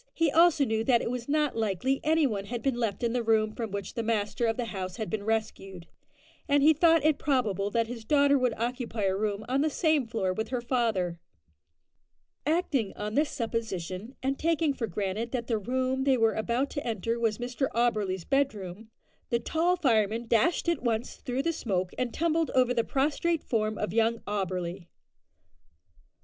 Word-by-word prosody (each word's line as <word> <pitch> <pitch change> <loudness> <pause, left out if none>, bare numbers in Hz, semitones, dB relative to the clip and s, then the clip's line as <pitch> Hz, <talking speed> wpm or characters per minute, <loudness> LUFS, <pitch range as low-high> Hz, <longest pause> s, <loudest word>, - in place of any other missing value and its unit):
He 330 -3 +2
also 325 -2 +5
knew 220 -2 0
that 240 -2 +3
it - - -2
was 250 +1 -5
not 300 -1 +1
likely 225 +5 0
any 315 0 +3
one 205 -6 -2
had 235 +2 -5
been 270 - +2
left 230 -3 -2
in 235 -1 +1
the 245 - +1
room 220 -1 +2
from 225 -1 -4
which 200 -1 -5
the 230 - -2
master 225 +1 0
of 225 - 0
the 245 - -1
house 185 -4 -5
had 220 0 -5
been 220 -2 -1
rescued, 205 -5 -3 0.6
and 285 -1 +3
he 315 +2 +7
thought 325 -1 +4
it 310 -2 +3
probable 215 -8 0
that 230 +2 +1
his 230 0 -7
daughter 285 +3 +4
would 255 -4 +1
occupy 235 -2 -3
a 190 -1 +2
room 210 +1 -2
on 265 +2 +1
the 310 - +2
same 310 -4 +1
floor 195 -5 -1
with 220 +4 -3
her 250 -1 -2
father. 225 -9 0 1.3
Acting 300 - 0
on 210 +1 -4
this 295 +4 +2
supposition, 220 -2 -4
and 270 +1 -1
taking 325 -2 +1
for 235 -4 -3
granted 205 +4 -3
that 240 -2 -2
the 225 -3 0
room 260 +4 -1
they 270 -1 +3
were 225 -2 +3
about 235 +5 -1
to 285 - -4
enter 230 +1 -1
was 225 -2 +1
Mr 245 +2 -2
Auberly's 210 -7 0
bedroom, 220 -7 -1 0.4
the 235 - +2
tall 330 +8 +1
fireman 230 - +1
dashed 240 +11 +2
at 340 -3 +1
once 235 -1 -2
through 255 +2 -3
the 335 - 0
smoke, 185 - -2
and 250 -2 -1
tumbled 330 +1 0
over 250 -1 +4
the 235 -2 +1
prostrate 300 +5 0
form 215 -2 -1
of 210 -3 -3
young 230 +1 +2
Auberly. 185 -3 -3
235 Hz, 190 wpm, -28 LUFS, 215-275 Hz, 1.3 s, he